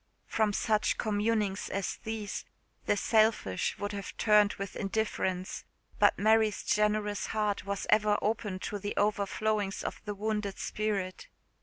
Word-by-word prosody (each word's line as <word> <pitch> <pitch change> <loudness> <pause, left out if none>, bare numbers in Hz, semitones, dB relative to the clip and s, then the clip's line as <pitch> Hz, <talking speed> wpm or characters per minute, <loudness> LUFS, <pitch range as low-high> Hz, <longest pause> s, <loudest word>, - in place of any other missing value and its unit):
From 220 -2 +1
such 215 +1 +1
communings 210 -2 0
as 195 0 -2
these 220 -2 -4 0.4
the 205 - +3
selfish 215 - +2
would 205 0 -3
have 200 -2 -6
turned 210 -1 +5
with 195 0 -6
indifference; 195 -3 -2 0.4
but - - +5
Mary's 220 -1 +3
generous 210 -1 +1
heart 210 -2 -1
was 200 0 -2
ever 210 0 +4
open 215 -3 -1
to 205 - -3
the 205 +1 -4
overflowings 205 0 0
of - - -5
the 205 -1 -3
wounded 210 -1 -2
spirit. 200 -4 -2
210 Hz, 135 wpm, -30 LUFS, 200-215 Hz, 0.4 s, turned